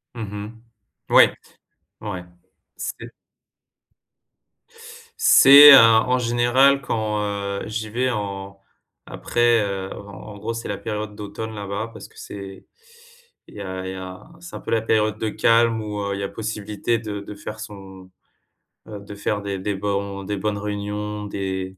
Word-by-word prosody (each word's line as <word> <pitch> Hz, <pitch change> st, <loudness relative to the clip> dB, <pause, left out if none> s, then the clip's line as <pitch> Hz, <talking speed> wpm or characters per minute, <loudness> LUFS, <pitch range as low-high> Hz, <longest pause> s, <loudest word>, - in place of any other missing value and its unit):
Mmh 115 Hz, -, -6 dB
mh. 105 Hz, +2 st, -8 dB, 0.5 s
Ouais. -, -, +7 dB, 0.7 s
Ouais. 95 Hz, -5 st, -6 dB, 0.5 s
C'est -, -, -5 dB, 2.2 s
C'est, 145 Hz, +2 st, +9 dB
heu, -, -, +11 dB
en 115 Hz, +2 st, +5 dB
général 125 Hz, +3 st, +3 dB
quand, 110 Hz, -3 st, -2 dB
heu, 100 Hz, -1 st, -3 dB
j'y 110 Hz, 0 st, -4 dB
vais 125 Hz, +4 st, 0 dB
en 100 Hz, -3 st, -5 dB, 0.5 s
après, 120 Hz, -1 st, +1 dB
heu, 95 Hz, -1 st, -4 dB
en 100 Hz, +1 st, -11 dB
gros, 115 Hz, -, -4 dB
c'est 115 Hz, 0 st, -6 dB
la 100 Hz, -, -3 dB
période 105 Hz, -1 st, -5 dB
d'automne 105 Hz, +2 st, -7 dB
là-bas 100 Hz, +2 st, -5 dB
parce 110 Hz, -, -10 dB
que -, -, -24 dB
c'est 95 Hz, -1 st, -9 dB, 0.8 s
il -, -, -16 dB
y 105 Hz, -, -7 dB
a 95 Hz, -1 st, -5 dB
il -, -, -4 dB
y -, -, -8 dB
a 95 Hz, 0 st, -8 dB, 0.2 s
c'est 170 Hz, 0 st, -11 dB
un -, -, -6 dB
peu -, -, -6 dB
la 115 Hz, -1 st, +2 dB
période 110 Hz, -1 st, +1 dB
de 110 Hz, -, -1 dB
calme 115 Hz, +1 st, +2 dB
où, 105 Hz, -1 st, -5 dB
heu, 100 Hz, 0 st, -2 dB
il -, -, -6 dB
y -, -, -3 dB
a 100 Hz, -, -3 dB
possibilité 110 Hz, +1 st, -3 dB
de 105 Hz, -3 st, -5 dB
de 100 Hz, -, -9 dB
faire 105 Hz, +1 st, -8 dB
son, 95 Hz, -3 st, -11 dB, 0.8 s
heu, 105 Hz, -2 st, -8 dB
de 100 Hz, 0 st, -10 dB
faire 105 Hz, +1 st, -2 dB
des 100 Hz, -1 st, -4 dB
des 100 Hz, +2 st, -2 dB
bons 100 Hz, 0 st, -3 dB
des 100 Hz, +1 st, -3 dB
bonnes 105 Hz, +1 st, -2 dB
réunions, 105 Hz, 0 st, -4 dB
des, 95 Hz, -2 st, -4 dB
105 Hz, 165 wpm, -22 LUFS, 100-110 Hz, 2.2 s, heu